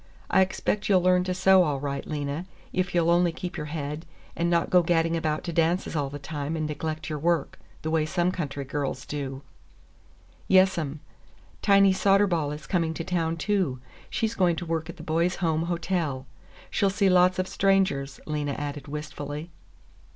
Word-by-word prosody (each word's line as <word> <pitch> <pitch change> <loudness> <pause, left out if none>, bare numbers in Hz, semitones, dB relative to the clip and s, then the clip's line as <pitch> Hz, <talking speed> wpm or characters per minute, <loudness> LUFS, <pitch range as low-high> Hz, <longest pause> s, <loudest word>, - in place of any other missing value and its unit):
"I 190 - +5
expect 195 +2 0
you'll 185 -3 +4
learn 180 0 +4
to 185 - -1
sew 190 0 +6
all 150 -6 +1
right, 140 0 -4
Lena, 145 +3 -3 0.3
if 180 -1 -1
you'll 170 -1 +3
only 175 0 +4
keep 180 +2 -6
your 150 - -4
head 150 +1 -5 0.3
and 170 +1 0
not 170 -1 +1
go 180 - +6
gadding 165 -1 +2
about 155 -2 -1
to 170 - -4
dances 165 +2 +1
all 145 -3 0
the 145 - -6
time 145 +1 -4
and 155 -1 -1
neglect 155 +1 -4
your 150 -1 -3
work, 165 -1 0 0.2
the 160 - -2
way 160 -1 +1
some 175 +2 +1
country 145 -6 -4
girls 140 -2 -3
do." 140 -2 -5 1.0
"Yes, 190 0 +5
'm. 150 -2 -4 0.6
Tiny 195 -1 +5
Soderball 190 -6 +2
is 150 +1 -7
coming 165 -3 0
to 165 - -3
town, 165 -2 -1
too. 180 -8 0 0.3
She's 225 0 -1
going 175 -3 +2
to 175 - -5
work 165 -1 -2
at 170 - -8
the 160 - -9
Boys' 170 +3 +1
Home 160 -2 0
Hotel. 170 -6 -1 0.5
She'll 200 - +2
see 195 +1 +2
lots 185 0 +5
of 185 0 0
strangers," 190 -10 +1
Lena 150 -2 -2
added 145 -1 -5
wistfully. 150 +2 -6
165 Hz, 180 wpm, -26 LUFS, 150-180 Hz, 1.0 s, sew